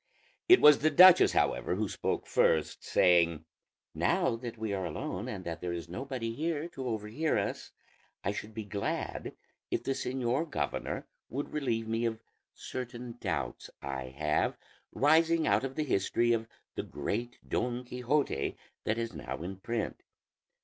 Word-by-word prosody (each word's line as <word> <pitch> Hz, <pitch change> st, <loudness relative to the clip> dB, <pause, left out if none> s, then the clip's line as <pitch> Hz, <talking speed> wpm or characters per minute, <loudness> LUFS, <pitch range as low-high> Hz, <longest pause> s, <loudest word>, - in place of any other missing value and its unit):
It 370 Hz, -, +9 dB
was 150 Hz, -1 st, +8 dB
the 155 Hz, -, +3 dB
duchess 180 Hz, +4 st, +8 dB
however 90 Hz, -, +1 dB
who 105 Hz, +2 st, 0 dB
spoke -, -, -2 dB
first, 80 Hz, -2 st, +2 dB
saying, 85 Hz, -3 st, +3 dB, 0.5 s
"Now -, -, +2 dB
that 120 Hz, 0 st, -7 dB
we 110 Hz, -2 st, -2 dB
are 95 Hz, -1 st, -2 dB
alone, 95 Hz, +6 st, -4 dB
and 100 Hz, -7 st, -5 dB
that 85 Hz, -1 st, -5 dB
there 90 Hz, -1 st, -2 dB
is 85 Hz, 0 st, -5 dB
nobody 120 Hz, +4 st, -4 dB
here 155 Hz, +3 st, -2 dB
to 130 Hz, -5 st, -6 dB
overhear 115 Hz, +7 st, -1 dB
us, -, -, -2 dB, 0.5 s
I 100 Hz, -, 0 dB
should 105 Hz, +1 st, -6 dB
be 110 Hz, -, -3 dB
glad 100 Hz, -1 st, -3 dB, 0.4 s
if -, -, -1 dB
the -, -, -1 dB
señor 130 Hz, +3 st, -1 dB
governor -, -, -2 dB, 0.2 s
would 140 Hz, +4 st, -4 dB
relieve 120 Hz, -7 st, -1 dB
me 115 Hz, +1 st, 0 dB
of 110 Hz, -1 st, -1 dB, 0.4 s
certain 120 Hz, -1 st, -6 dB
doubts -, -, -3 dB
I 65 Hz, -1 st, -4 dB
have, 75 Hz, +4 st, 0 dB, 0.3 s
rising 160 Hz, +3 st, +4 dB
out 100 Hz, +4 st, +3 dB
of 135 Hz, 0 st, -4 dB
the 155 Hz, -, 0 dB
history 120 Hz, -1 st, +2 dB
of 115 Hz, -1 st, -1 dB, 0.3 s
the -, -, -2 dB
great 115 Hz, +12 st, -4 dB
Don 125 Hz, 0 st, -1 dB
Quixote 125 Hz, -, -1 dB, 0.3 s
that 110 Hz, -, +1 dB
is 115 Hz, -3 st, -3 dB
now 75 Hz, +1 st, -6 dB
in 95 Hz, +2 st, -5 dB
print. 115 Hz, +2 st, -3 dB
115 Hz, 155 wpm, -31 LUFS, 95-135 Hz, 0.5 s, It